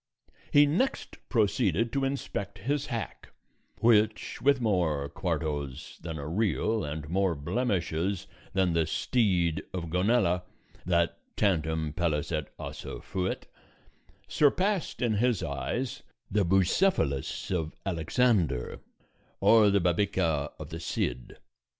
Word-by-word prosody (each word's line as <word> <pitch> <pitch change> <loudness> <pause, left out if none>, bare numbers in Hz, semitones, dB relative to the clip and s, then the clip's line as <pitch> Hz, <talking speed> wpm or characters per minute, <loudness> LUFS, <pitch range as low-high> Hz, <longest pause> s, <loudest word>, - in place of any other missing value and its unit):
He 145 0 +7
next 180 - -1
proceeded 110 -1 +1
to 135 -1 +1
inspect 105 -7 -3
his 140 +8 -1
hack, 115 -5 -5 0.5
which, 110 -2 +3
with 140 +1 +4
more 85 - +1
quartos 75 -2 -3
than 80 -1 -5
a 70 0 -5
real 110 +4 0
and 75 0 -5
more 95 +1 +1
blemishes 90 - -1 0.3
than 95 -2 +2
the 80 -2 +2
steed 90 -6 +1
of 85 -3 -4
Gonela, 90 -1 +2 0.5
that 85 -1 +1 0.2
"tantum 80 -6 +1
pellis 80 -3 -1
et 75 -3 -2
ossa - - -7
fuit," 95 0 -3 0.8
surpassed 185 +3 +1
in 115 -2 +2
his 120 -2 +1
eyes 115 - -3 0.3
the 105 +1 +3
Bucephalus 95 - +1
of 80 -4 -2
Alexander 85 - +1 0.6
or 110 -2 +6
the 100 0 +3
Babieca 85 -5 +1
of 80 +1 -9
the 80 - -5
Cid. 60 -6 -3
95 Hz, 115 wpm, -29 LUFS, 80-115 Hz, 0.8 s, He